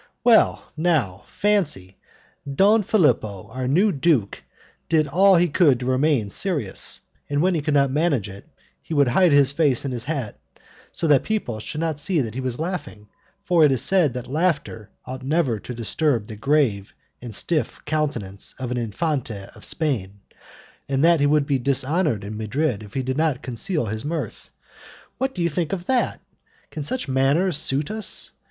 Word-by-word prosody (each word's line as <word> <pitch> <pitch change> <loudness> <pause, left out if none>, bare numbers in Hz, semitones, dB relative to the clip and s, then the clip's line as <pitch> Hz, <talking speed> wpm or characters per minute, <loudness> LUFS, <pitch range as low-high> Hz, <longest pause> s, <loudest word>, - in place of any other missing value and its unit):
Well, 230 -2 +3
now, 145 - 0
fancy, 155 - -1 0.5
Don 205 +10 +4
Philipo, 110 - +1
our 130 +1 -4
new 185 +10 +3
duke, 140 - 0 0.5
did 155 -2 +3
all 190 +7 +4
he 175 +1 +4
could 145 -5 +3
to 125 - -5
remain 130 -4 +1
serious, 150 - -1 0.3
and 145 0 0
when 185 +4 +2
he 160 - 0
could 150 0 -1
not 140 -2 +3
manage 145 - +1
it, 100 0 -12 0.3
he 160 - -6
would 140 -3 +4
hide 180 +7 +4
his 140 -1 +5
face 140 -4 +1
in 135 - -2
his 120 -2 -4
hat 135 -8 -4 0.5
so 170 - -3
that 145 -4 +5
people 200 - -3
should 150 +8 -5
not 160 -3 -2
see 165 +2 +1
that 115 -5 -2
he 130 - -4
was 130 -2 -3
laughing, 160 - -5 0.3
for 175 -5 +3
it 150 - +5
is 130 - 0
said 175 -9 +2
that 125 - -5
laughter 145 - -2 0.2
ought 130 +1 -7
never 135 -5 0
to 125 - -9
disturb 120 +1 0
the 110 - -9
grave 115 -4 0 0.3
and 120 -4 -6
stiff 160 +5 -1
countenance 130 -11 -3
of 125 -2 -5
an 125 - -1
Infante 120 - -3
of - - -15
Spain, 110 - -2 0.7
and 135 +1 +1
that 170 -1 +5
he 145 - +3
would 150 -1 +2
be 140 -2 0
dishonoured 140 - +1
in 105 +2 -6
Madrid 110 +2 -1
if 105 -2 -13
he 135 - -1
did 130 +1 -3
not 155 -4 0
conceal 130 +4 -1
his 110 +1 -4
mirth. 160 +2 -5 0.7
What 265 0 -1
do 175 - -1
you 170 - +2
think 165 +2 -2
of 180 -2 -4
that? 255 +2 0 0.5
Can 155 - -5
such 195 - -2
manners 140 +7 +2
suit 140 +2 -1
us? 220 -1 +2
140 Hz, 180 wpm, -23 LUFS, 120-165 Hz, 0.7 s, his